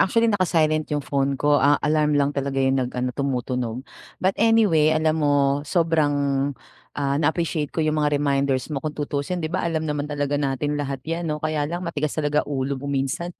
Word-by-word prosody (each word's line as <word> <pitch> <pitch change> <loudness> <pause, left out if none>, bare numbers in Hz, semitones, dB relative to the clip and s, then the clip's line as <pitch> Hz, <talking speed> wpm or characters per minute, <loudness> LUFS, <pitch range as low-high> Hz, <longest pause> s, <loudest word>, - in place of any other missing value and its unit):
Actually 230 +3 +3
naka-silent 160 -5 +1
yung 145 -2 -2
phone 140 -1 0
ko, 145 +2 +3
ah, 145 +2 +5
alarm 150 0 +2
lang 145 0 +2
talaga 140 -1 -3
yung 135 0 +2
nag 125 - -1
ano 125 0 -1
tumutunog. 125 -2 -2 0.3
But 190 +1 +1
anyway, 210 -9 +4
alam 155 0 +1
mo 145 -1 +2
sobrang, 160 -1 +1 0.8
ah, 140 0 0
na-appreciate 160 -1 0
ko 160 - -2
yung 155 0 +1
mga 150 -1 +2
reminders 140 -1 0
mo, 140 - -2
kung 155 0 -5
tuusin 150 +4 -3
di 155 - -4
ba, 185 - 0
alam 160 -2 -1
naman 150 -1 -2
talaga 145 -1 -1
natin 145 +1 -1
lahat 135 -2 -4
'yan 165 +1 -3
'no, 150 - -1
kaya 150 -1 -2
lang 175 +2 -4
matigas 155 -3 -2
talaga 150 -1 +1
ulo 135 -1 -2
mo 140 - -5
minsan. 135 +5 -1
145 Hz, 195 wpm, -23 LUFS, 140-155 Hz, 0.8 s, ah